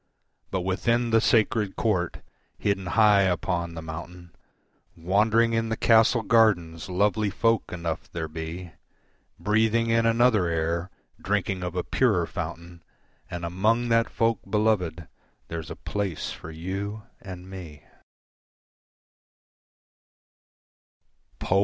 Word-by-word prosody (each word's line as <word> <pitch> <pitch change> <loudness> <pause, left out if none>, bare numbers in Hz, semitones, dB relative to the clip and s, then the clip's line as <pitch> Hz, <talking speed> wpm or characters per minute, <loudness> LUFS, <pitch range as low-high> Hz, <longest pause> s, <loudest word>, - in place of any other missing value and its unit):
But 95 - -1
within 115 +6 0
the 115 0 +4
sacred 110 -3 +2
court, 95 -7 -1 0.3
hidden 95 -2 -1
high 105 0 +5
upon 85 -2 -1
the 80 - -6
mountain, 85 +2 -9 0.6
Wandering 110 +7 +2
in 115 0 0
the 115 - -2
castle 115 +1 +4
gardens 95 -8 +2
lovely 105 +3 +1
folk 115 +1 +1
enough 85 -2 -4
there 80 -2 -4
be, 80 +3 -7 0.7
Breathing 110 +2 +2
in 115 0 +3
another 115 -5 +3
air, 85 +2 -1 0.3
drinking 95 -1 -1
of 90 -1 -4
a 90 - -1
purer 105 -10 +2
fountain 85 +1 -7 0.5
And 85 -2 -5
among 110 +7 +1
that 115 0 +3
folk, 115 -2 +1
beloved, 95 -7 0 0.4
there's 80 -2 -5
a - - -6
place 100 -6 -3
for - - -9
you 95 +6 -5 0.2
and 90 -2 -9
me. 85 -6 -10
95 Hz, 115 wpm, -26 LUFS, 85-110 Hz, 0.7 s, high